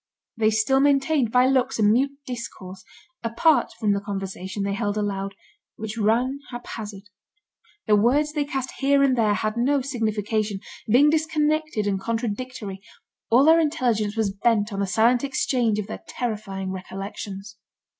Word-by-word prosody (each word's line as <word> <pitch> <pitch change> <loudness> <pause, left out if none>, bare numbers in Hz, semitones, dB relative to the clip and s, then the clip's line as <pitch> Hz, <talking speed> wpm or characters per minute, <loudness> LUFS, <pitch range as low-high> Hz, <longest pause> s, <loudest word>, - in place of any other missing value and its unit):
They 220 -1 +3
still 220 +5 +2
maintained 275 -3 +2
by 250 +1 +5
looks 260 0 +2
a 220 - +1
mute 260 +7 +3
discourse, 200 -7 -7 0.4
apart 235 +7 +2
from 210 -3 +2
the 200 - -1
conversation 195 -1 -5
they 200 0 -1
held 205 -1 -2
aloud, 200 -1 -2 0.4
which 215 0 -6
ran 235 +5 +1
haphazard. 220 -5 -7 0.8
The 215 - +4
words 280 +8 +2
they 300 -2 0
cast 270 -2 -3
here 275 0 +3
and 265 -2 +3
there 215 -4 +2
had 215 +2 -2
no 275 +4 +2
signification, 215 -5 -1 0.3
being 270 +7 +5
disconnected 310 -5 0
and 195 -2 0
contradictory; 225 -2 -4 0.5
all 250 +5 +5
their 325 +1 +7
intelligence 235 -9 0
was 210 -3 0
bent 210 0 +1
on 195 - -3
the 200 - 0
silent 235 +6 +3
exchange 250 -5 +1
of 210 - -2
their 220 - -7
terrifying 205 -5 -4
recollections. 195 +2 -7
225 Hz, 150 wpm, -24 LUFS, 205-265 Hz, 0.8 s, their